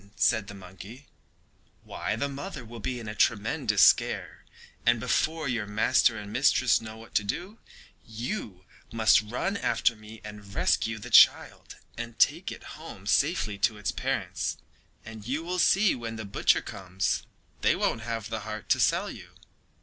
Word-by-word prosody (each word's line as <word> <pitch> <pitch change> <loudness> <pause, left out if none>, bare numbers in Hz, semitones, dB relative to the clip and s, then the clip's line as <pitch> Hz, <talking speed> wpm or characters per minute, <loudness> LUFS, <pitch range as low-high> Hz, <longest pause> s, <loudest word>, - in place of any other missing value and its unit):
said 110 -4 +2
the 100 - -9
monkey. 100 +8 -12 0.8
"Why - - -3
the 115 +6 -1
mother 140 -3 -7
will 115 +1 -10
be 125 +3 -3
in 115 - -8
a 105 - -4
tremendous 110 0 +2
scare, - - +2 0.4
and 120 0 +3
before 155 +6 0
your 115 -4 -2
master 110 +2 +2
and 105 0 -8
mistress 130 -1 +3
know 110 0 -9
what 115 +1 -14
to 105 - +2
do, 185 - -5 0.4
you 110 - -6 0.3
must 110 -3 +4
run 125 - -3
after 120 -10 +1
me 110 +1 -13
and 105 -1 -10
rescue 115 0 +1
the 105 - -9
child - - +5 0.2
and 120 -1 -6
take - - +2
it - - -9 0.2
home - - -10
safely 105 -2 +1
to 105 +2 +1
its 105 - -2
parents, - - -2 0.5
and 110 -1 -10
you 145 +6 -2
will 180 +2 -3
see 195 +3 +4
that - - -7
when 115 -1 -5
the 110 -1 -6
butcher 100 - +2
comes 95 -1 -2 0.4
they - - +3
won't 115 - -1
have 115 -1 -4
the 110 - -2
heart 110 -1 -7
to - - +3
sell - - +2
you." - - -12
110 Hz, 170 wpm, -27 LUFS, 105-125 Hz, 0.8 s, child